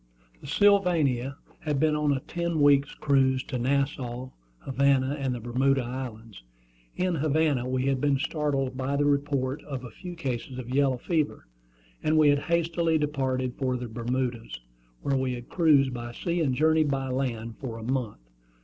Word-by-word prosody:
The - - -11
Sylvania 155 - +2 0.2
had 150 -3 -1
been 155 0 +3
on 150 -1 +1
a 135 -2 0
ten 170 0 -2
weeks' 145 -1 +4
cruise 135 -3 +2
to 130 - -4
Nassau, 130 -1 -1 0.3
Havana, 135 0 +2
and 135 -2 -1
the - - -5
Bermuda 130 +3 +1
Islands. 115 - -7 0.5
In 185 0 0
Havana 150 -4 +1
we 130 0 0
had 135 -2 +1
been 145 -2 +2
startled 140 -3 -1
by 130 +2 -2
the 145 +1 +2
report 140 -1 0
of 135 -4 -6
a 125 - -8
few 180 +6 -8
cases 130 -5 -4
of 125 0 -6
yellow 135 -2 +3
fever, 155 +3 -1 0.6
and 155 +1 +2
we 155 -1 +6
had 145 0 +4
hastily 170 0 +1
departed 130 -4 -1
for 130 -2 0
the 125 0 -5
Bermudas, 120 - -3 0.4
where 140 - +1
we 130 -1 0
had 120 -1 -8
cruised 145 -6 +4
by 120 -1 -5
sea 170 +6 -2
and 135 -5 +1
journeyed 155 +1 +3
by 135 -1 -1
land 120 -4 -3
for 120 -4 -5
a 115 - -8
month. 125 -3 -2
135 Hz, 170 wpm, -27 LUFS, 125-150 Hz, 0.6 s, we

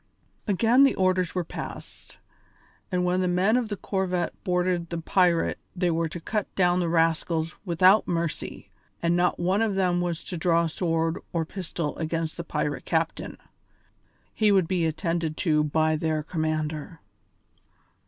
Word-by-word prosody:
Again 225 +6 +4
the 275 - +4
orders 185 -2 +1
were 180 - 0
passed, - - -8 0.7
that 180 -2 0
when 180 +1 +1
the 185 - +1
men 185 +5 +2
of 245 -3 0
the 205 - -3
corvette 185 -3 -1
boarded 180 -2 0
the 170 - -3
pirate 175 0 +2 0.2
they 180 -1 +1
were 165 0 0
to 175 - -6
cut 210 +5 -2
down 180 -1 +3
the 175 -2 0
rascals 165 0 +1
without 185 +4 +4
mercy, 170 -2 -3 0.3
and 170 0 +2
not 175 0 +1
one 185 +4 +1
of 220 -3 +1
them 180 -2 +1
was 175 -2 -2
to 180 - -5
draw 170 0 +2
sword 165 0 -1
or 165 -2 0
pistol 165 -3 -4
against 165 0 -2
the 170 - -5
pirate 150 -3 -3
captain. 160 0 -1 1.0
He 215 -2 +3
would 190 -4 +3
be 175 -3 +1
attended 160 0 -2
to 150 -2 +3
by 155 +1 +2
their 155 -1 -1
commander. 155 0 -3
175 Hz, 155 wpm, -26 LUFS, 160-185 Hz, 1.0 s, Again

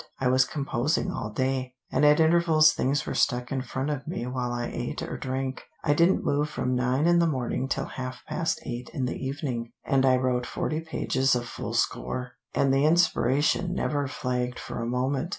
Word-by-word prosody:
"I 130 - +2
was 130 0 +4
composing 140 +1 -1
all 110 - -4
day, 130 +2 -2 0.2
and 135 - +1
at 150 +1 +6
intervals 160 -1 +5
things 140 +3 0
were - - -3
stuck 125 -2 +1
in 135 -1 -1
front 130 +3 -3
of 140 -2 -4
me 160 -7 -3
while 125 -1 -2
I 120 0 -2
ate - - -4
or - - -5
drank. 130 0 -3 0.2
I 145 - +3
didn't 170 +5 +3
move 145 +1 +1
from 125 -3 -2
nine 125 +4 +1
in 175 0 +5
the 170 - +4
morning 130 -2 -1
till - - -1
half 130 0 -6
past 165 -2 -1
eight 120 -2 -5
in 135 -4 0
the 125 - -2
evening, 130 -4 -3
and 135 -1 +2
I 130 -1 +5
wrote 125 -1 0
forty 155 - -2
pages 135 -5 +1
of 120 -1 -2
full - - -5
score, 125 0 -1 0.2
and 135 -1 +3
the 135 +1 +3
inspiration 155 +1 +2
never 145 -5 0
flagged 125 -2 -2
for - - -5
a 115 - -2
moment. 130 +5 -1
130 Hz, 200 wpm, -27 LUFS, 125-150 Hz, 0.2 s, at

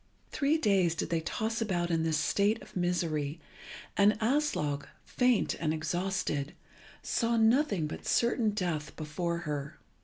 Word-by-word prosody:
Three 295 +2 +2
days 195 - +2
did - - -3
they 165 -1 +1
toss 220 +7 -2
about 175 -5 0
in 165 -1 +2
this 160 -1 +1
state 200 +9 +2
of - - -16
misery, 165 -4 -1 0.6
and 205 +1 +5
Aslog, 220 - 0 0.2
faint 250 -3 +2
and 155 -1 0
exhausted, 165 -2 -2 0.5
saw 230 -1 +1
nothing 225 - +3
but 150 - -6
certain 235 -2 +2
death 175 -7 -2
before 170 +2 -3
her. 150 -1 -4
175 Hz, 140 wpm, -30 LUFS, 155-220 Hz, 0.6 s, and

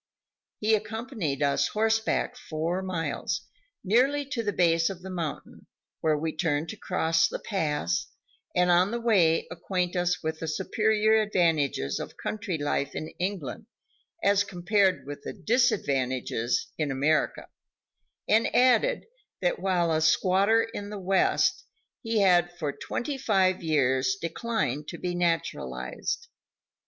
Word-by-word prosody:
He 215 +1 +1
accompanied 215 - -2
us 140 -1 +2
horseback 220 +2 0
four 170 -4 -3
miles, 175 -1 -2 0.4
nearly 260 +8 +2
to 235 - -1
the 210 -2 -1
base 165 -2 +3
of 185 -2 -8
the 190 - -7
mountain, 165 -5 -6 0.3
where 155 -1 +2
we 160 +1 -3
turned 155 -1 0
to - - -5
cross 165 -4 +1
the - - -4
pass, 150 - -1 0.5
and 180 0 +4
on 180 +2 +4
the 235 +2 -2
way 185 -9 +3
acquaint 180 +1 -2
us 180 0 0
with 160 0 -3
the 165 - -4
superior 215 +5 +2
advantages 160 - +1
of - - -7
country 210 -5 -3
life 145 -1 -2
in 155 - -4
England 180 - -4 0.6
as 200 0 +4
compared 190 +1 +1
with 145 +1 -7
the - - -6
disadvantages 130 - 0
in 150 -2 0
America, 145 +4 +1 0.8
and 220 +2 +4
admitted 255 - +3 0.3
that, - - 0
while 175 -3 +1
a 160 0 +1
squatter 195 +7 +3
in 205 0 -5
the 210 - -6
West, 190 0 +2 0.4
he 225 -3 0
had 175 -2 +4
for 150 -4 -2
twenty 275 +2 -4
five 190 -7 +2
years 130 -5 +1
declined 170 - -2
to - - -6
be 180 -1 -3
naturalized. 175 - -2
180 Hz, 135 wpm, -27 LUFS, 160-215 Hz, 0.8 s, and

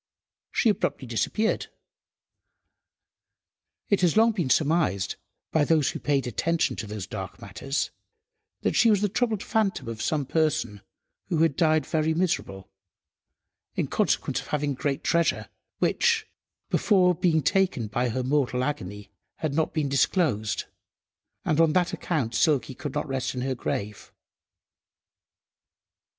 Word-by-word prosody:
She 230 - +3
abruptly 200 -9 -1
disappeared. 165 - 0 2.2
It 200 - +3
had 180 +2 +3
long 225 +1 +6
been 175 -11 -2
surmised, 145 - +1 0.4
by 155 - +3
those 155 -2 +2
who - - -6
paid 140 -3 0
attention 160 +8 0
to 110 - -5
those 105 -2 -5
dark - - -7
matters, 135 +2 -3 0.7
that - - 0
she 230 - +5
was 205 -2 +3
the 205 - +2
troubled 225 -1 0
phantom 215 - 0
of 115 -1 -5
some 150 -3 0
person, 130 -9 0 0.5
who 170 - 0
had 160 -4 +2
died 155 -3 +3
very 160 0 0
miserable, 160 - -1 1.1
in - - 0
consequence - - 0
of - - -13
having 145 -1 -1
great 135 +1 -2
treasure, 170 -1 +1 0.3
which, 460 -2 +2 0.4
before 185 -4 +4
being 165 -3 +1
taken 185 - +1
by 120 +4 -1
her 125 +3 -2
mortal 130 -2 +1
agony, 105 -9 -4 0.2
had 155 -3 -3
not 160 +1 +1
been 155 -3 -1
disclosed, 135 - +1 0.8
and 155 +1 +3
on 160 -2 +4
that 180 0 +2
account 135 -10 -2
Silky 140 +1 +2
could 145 +3 -6
not 150 - -1
rest 130 -2 -2
in 125 - -3
her 130 +1 -1
grave. 105 -4 -4
150 Hz, 135 wpm, -26 LUFS, 125-175 Hz, 2.2 s, long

